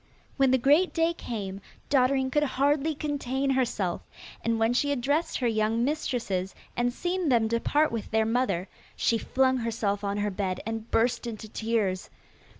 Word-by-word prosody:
When 270 -1 +3
the 260 - +4
great 295 +8 +3
day 330 0 +2
came, 200 - -5 0.3
Dotterine 265 -1 +3
could 295 - +2 0.2
hardly 290 +3 +2
contain 275 -2 -1
herself, 230 -9 0 0.4
and 230 0 +1
when 225 +1 +2
she 285 +3 +1
had 285 -3 0
dressed 285 +7 0
her 250 - 0
young 220 +1 +1
mistresses 235 -10 -2 0.2
and 240 0 +1
seen 350 +4 -1
them 230 -3 +3
depart 290 +7 +1
with 230 -2 -4
their 220 0 +2
mother 220 -6 0 0.3
she 230 - +1
flung 260 +2 +2
herself 220 -4 -1
on 200 0 -1
her 205 0 0
bed, 185 -2 -2
and 225 0 -4
burst 240 +1 +1
into 220 -1 -6
tears. 215 -4 -1
240 Hz, 165 wpm, -27 LUFS, 220-275 Hz, 0.4 s, the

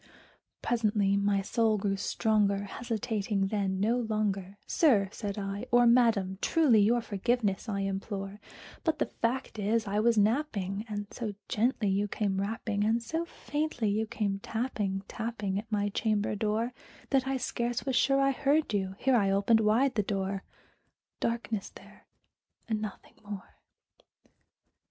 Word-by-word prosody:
Presently 210 -4 +2
my 200 0 +2
soul 220 +1 +2
grew 195 0 0
stronger; 200 0 +1
hesitating 210 -2 -2
then 195 -3 -1
no 225 +5 +2
longer, 205 -4 -2
"Sir," 215 - +3
said 205 -2 -5
I, 200 0 -4
"or 245 0 +5
Madam, 225 -6 +3
truly 295 -10 +4
your 235 +4 +3
forgiveness 220 0 -1
I 200 -1 -1
implore; 195 +1 -4 0.4
But 320 - +1
the - - +1
fact 235 -1 -2
is 220 +2 +1
I 205 +1 0
was 230 +1 +3
napping, 210 -3 +1
and 205 -1 -3
so 215 -5 -4
gently 235 -2 +1
you 200 +1 +1
came 195 -2 -1
rapping, 210 0 -2
And 225 +2 +1
so 325 +7 -2
faintly 295 -8 -2
you 220 +2 0
came 200 -3 -2
tapping, 205 -4 -2
tapping 210 -4 -3
at 220 +1 -10
my 205 -1 +1
chamber 210 0 0
door, 220 +3 -1 0.4
That 265 -1 +2
I 270 0 0
scarce 240 -1 -2
was 265 -2 0
sure 275 +2 +4
I 275 0 +4
heard 285 0 +1
you" 190 -1 -1
here 265 +3 +2
I 200 -4 +3
opened 200 +3 +4
wide 225 +5 +3
the 210 - +2
door; 195 -1 -2 0.8
Darkness 230 -3 -2
there, - - -16 0.6
and 220 -2 -1
nothing 215 -2 -7
more. 205 -2 -9
215 Hz, 150 wpm, -30 LUFS, 200-235 Hz, 0.8 s, or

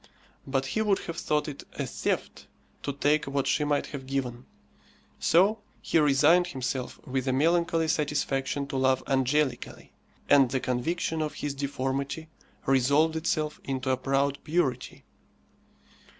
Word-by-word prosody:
But 135 0 0
he 220 +11 -1
would 205 -3 +3
have 165 -1 -5
thought 150 +1 0
it 145 -2 -7
a - - -3
theft - - -3 0.3
to 140 - -2
take 145 +2 +1
what 135 0 -1
she 150 - +1
might 145 -1 +1
have 135 -2 -6
given; 130 -3 -3 0.7
so 195 +6 +4 0.2
he 165 - +1
resigned 150 +5 +4
himself 130 -4 -4
with 130 0 -2
a - - +3
melancholy 165 +3 +2
satisfaction 145 -2 -1
to 135 - -2
love 130 0 +2
angelically, 135 0 -1 0.3
and 140 -3 +6
the 130 - 0
conviction 160 +6 -1
of 155 -1 -3
his 145 -1 -3
deformity 140 +2 -3 0.4
resolved 140 +5 +3
itself 155 -1 -1
into 130 -1 -2
a 130 - +1
proud 135 +1 0
purity. 150 -6 -1
140 Hz, 140 wpm, -28 LUFS, 135-155 Hz, 0.7 s, and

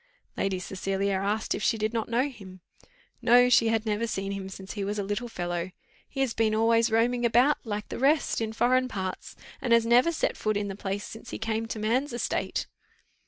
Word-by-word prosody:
Lady 195 -1 -1
Cecilia 195 +2 -2
asked 210 +2 0
if - - -4
she 225 - +2
did 215 +1 -1
not 225 -1 -2
know 245 +4 +2
him? 190 -9 -12 0.6
No, 245 +1 +6
she 240 -2 +5
had 225 0 +1
never 215 +2 0
seen 195 -3 -3
him 195 -1 -5
since 190 0 -8
he 205 - -3
was 205 +2 -2
a 205 - -1
little 205 +5 -3
fellow: 175 -4 -3 0.4
"he 270 - -3
has 260 -4 +1
been 220 -1 +1
always 230 +1 +3
roaming 240 +2 +2
about, 245 +5 +4
like 210 -1 -3
the - - -5
rest, 280 -1 +2
in 220 -1 -1
foreign 255 +3 +2
parts, 190 -6 -5 0.3
and 245 -3 +2
has 230 -1 +5
never 245 +8 +5
set 325 - -1
foot 215 -1 -1
in 205 -1 -2
the 195 - -5
place 200 0 -3
since 225 +2 -10
he - - -5
came 225 0 -2
to 225 - -5
man's 240 +6 0
estate." 240 - -2
225 Hz, 210 wpm, -27 LUFS, 200-240 Hz, 0.6 s, No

